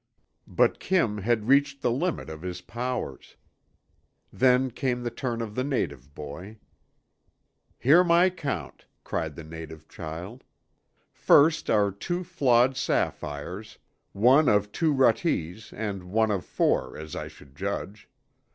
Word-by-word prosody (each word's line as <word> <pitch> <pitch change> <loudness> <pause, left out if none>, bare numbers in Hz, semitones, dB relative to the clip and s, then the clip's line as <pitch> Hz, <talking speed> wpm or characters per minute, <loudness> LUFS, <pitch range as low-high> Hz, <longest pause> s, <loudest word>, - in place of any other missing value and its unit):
'" - - -49
But - - +2
Kim 120 - +1
had 110 +1 0
reached 140 +1 +3
the 120 - +2
limit 165 +8 -1
of 80 0 -8
his 90 0 -5
powers. 120 - -5 1.0
Then 130 +1 +3
came 125 0 -2
the 120 - -2
turn 120 -1 -3
of 105 -2 -7
the 130 - -1
native 70 - -3
boy. 90 +9 -8 1.2
"'Hear 155 +8 +5
my 175 +1 +4
count,' 150 -6 -5 0.2
cried 80 -2 -3
the 85 - -8
native 80 0 -10
child. 90 +10 -8 0.7
'First 155 +2 +4
are 105 -2 +3
two 175 - -3
flawed 130 -5 +3
sapphires, 90 - -3 0.3
one 130 +8 +5
of 105 0 +2
two 160 +5 +1
ruttes 115 - +1
and 100 -4 -5
one 110 +4 +1
of 95 -5 -2
four, - - 0
as 80 0 -8
I - - -4
should 70 -1 -16
judge. 100 +3 -5
110 Hz, 135 wpm, -26 LUFS, 90-135 Hz, 1.2 s, Hear